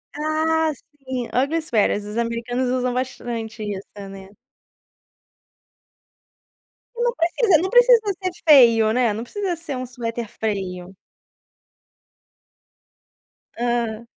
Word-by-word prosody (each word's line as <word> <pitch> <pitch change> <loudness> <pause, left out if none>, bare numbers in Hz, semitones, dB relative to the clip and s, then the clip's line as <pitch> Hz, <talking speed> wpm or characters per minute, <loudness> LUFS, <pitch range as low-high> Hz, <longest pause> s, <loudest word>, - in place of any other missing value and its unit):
Ah, 315 +1 +1
sim, 260 -3 -7
ugly 280 +6 +1
sweaters, 215 -7 0
os 210 +2 -6
americanos 235 +2 -1
usam 250 0 0
bastante 235 -3 -4
isso, 200 -1 -5 0.2
né. 195 0 -11 2.7
Não 475 0 +1
precisa 350 +1 +3
não 375 - -1
precisa - - +6 0.2
ser 370 - 0 0.2
feio, 230 -7 +7
né, 240 -3 +2
não 220 - -5
precisa 380 - -3
ser 330 -4 -6
um 255 - -4
suéter 235 -2 -5
feio. 190 -4 -4 2.6
Hã. 235 -1 -2
245 Hz, 100 wpm, -22 LUFS, 225-315 Hz, 2.7 s, feio